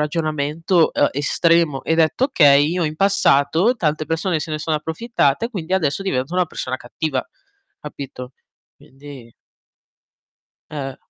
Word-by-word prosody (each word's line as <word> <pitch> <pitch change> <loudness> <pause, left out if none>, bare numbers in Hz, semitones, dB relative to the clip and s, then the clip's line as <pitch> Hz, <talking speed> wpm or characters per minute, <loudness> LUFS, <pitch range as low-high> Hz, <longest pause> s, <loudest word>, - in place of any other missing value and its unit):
ragionamento, 155 +2 0
uhm, - - +3
estremo 155 0 +1
e 160 - +1
detto: 165 +10 +2
"Okay, 145 - +5
io 175 -2 -1
in 150 - -3
passato 195 - +2
tante 155 -5 -1
persone 165 +1 -1
se 155 - -5
ne 155 - -2
sono 155 0 -1
approfittate 160 - -1
quindi 185 -5 -6
adesso 165 +1 0
divento 130 -5 -2
una 180 -1 +2
persona 130 -4 -5
cattiva." 130 +2 -3 0.6
Capito? 135 -3 -9 0.4
Quindi 135 -3 -14 1.4
Eh. 135 -3 -6
155 Hz, 130 wpm, -20 LUFS, 140-170 Hz, 1.4 s, Okay